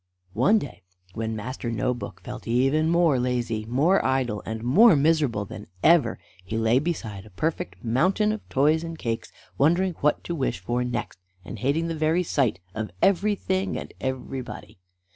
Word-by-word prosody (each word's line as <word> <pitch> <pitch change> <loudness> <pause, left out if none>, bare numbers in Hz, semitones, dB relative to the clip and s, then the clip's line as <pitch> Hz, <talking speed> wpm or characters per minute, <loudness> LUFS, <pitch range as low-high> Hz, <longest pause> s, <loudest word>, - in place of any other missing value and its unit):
One 215 +3 +4
day, 120 - -6 0.3
when 110 0 -3
Master 120 +2 -5
No 115 +2 0
book 120 - -8
felt - - -8
even 135 +7 +2
more 170 -6 +3
lazy, 120 -3 -1
more 145 - +2
idle, 130 -6 0
and 110 0 -4
more 180 - +6
miserable 145 -8 +2
than - - -9 0.2
ever, 160 -9 +4 0.3
he 110 +4 -4
lay 115 +3 +3
beside 115 - -4
a 110 - -14
perfect 90 - -3
mountain 185 - +2
of 215 - -6
toys 150 +4 +2
and 165 -1 -6
cakes, 115 -5 -3 0.3
wondering 175 +6 +3
what 150 +1 +2
to 170 - -4
wish 135 - -1
for 120 +8 -2
next, 120 -5 -4 0.3
and 110 - -7
hating 145 +8 0
the 165 - -2
very 160 +3 +1
sight 130 - 0
of 110 +1 -4
everything 195 -1 +1
and - - -7
everybody. 130 -5 -5
130 Hz, 165 wpm, -25 LUFS, 115-165 Hz, 0.3 s, more